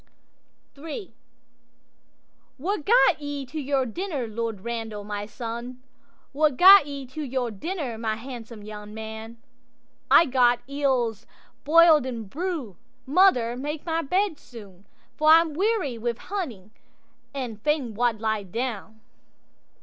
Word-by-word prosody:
'III'What 325 - -10
gat 470 -8 +4
ye 285 -1 -4
to 310 +5 -6
your 270 -1 0
dinner, 290 - -4
Lord 225 -2 -4
Randal, 225 -2 -5
my 205 0 -5
son? 235 +2 -7 0.5
What 290 -2 +1
gat 380 -3 +9
ye 280 -2 -6
to 265 +5 -8
your 255 -4 -2
dinner, 260 - -5
my 220 -1 -1
handsome 230 -2 -9
young 210 0 -9
man?'—'I 230 +7 -2
gat 245 -3 +3
eels 260 -6 -1 0.4
boil'd 315 -3 +6
in 235 -3 -4
broo'; 305 - -4 0.3
mother, 265 -7 +3
make 295 +5 -5
my 330 -1 0
bed 360 +1 0
soon, 205 -8 -14 0.3
For 310 0 +3
I'm 325 0 +6
weary 370 - 0
wi' 235 +1 -2
hunting, 245 - -6 0.6
and 245 -6 -6
fain 290 -5 0
wald 235 0 0
lie 220 -1 -1
down. 220 +1 -5
255 Hz, 120 wpm, -25 LUFS, 225-305 Hz, 0.6 s, gat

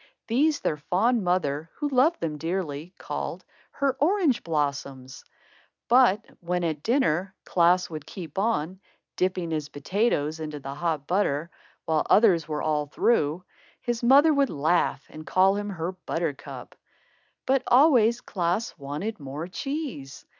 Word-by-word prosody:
These, 290 +6 +2
their 150 - -1
fond 205 +9 +1
mother, 165 -4 0
who 295 - -2
loved 285 +5 +2
them 150 -2 -3
dearly, 165 -2 -3
called - - -5 0.2
her 275 -1 0
"orange 325 - +2
blossoms"; 140 -4 -3 0.6
but 235 -4 +4
when 180 0 -2
at 155 -3 -2
dinner, 195 - +1
Klaas 180 +1 +3
would 155 -3 -8
keep 170 -2 -7
on, 190 -4 -1 0.4
dipping 180 -2 -1
his 155 -2 -2
potatoes 155 -1 -1
into 155 -2 -5
the 140 0 -6
hot 155 -1 -2
butter, 170 -3 0 0.3
while 155 -1 0
others 185 -7 +5
were 150 -1 -3
all 150 -1 0
through, 155 -1 +1 0.4
his 240 -1 -3
mother 280 +6 +6
would 280 -1 +2
laugh 155 -1 0
and 155 0 -11
call 190 +1 +4
him 205 0 -3
her 175 -2 -3
Buttercup. 170 -5 -5 0.7
But 265 0 +2
always 245 -4 +5
Klaas 180 +4 -2
wanted 150 +11 -4
more 145 +4 -6
cheese. 265 - -5
180 Hz, 140 wpm, -26 LUFS, 150-230 Hz, 0.7 s, mother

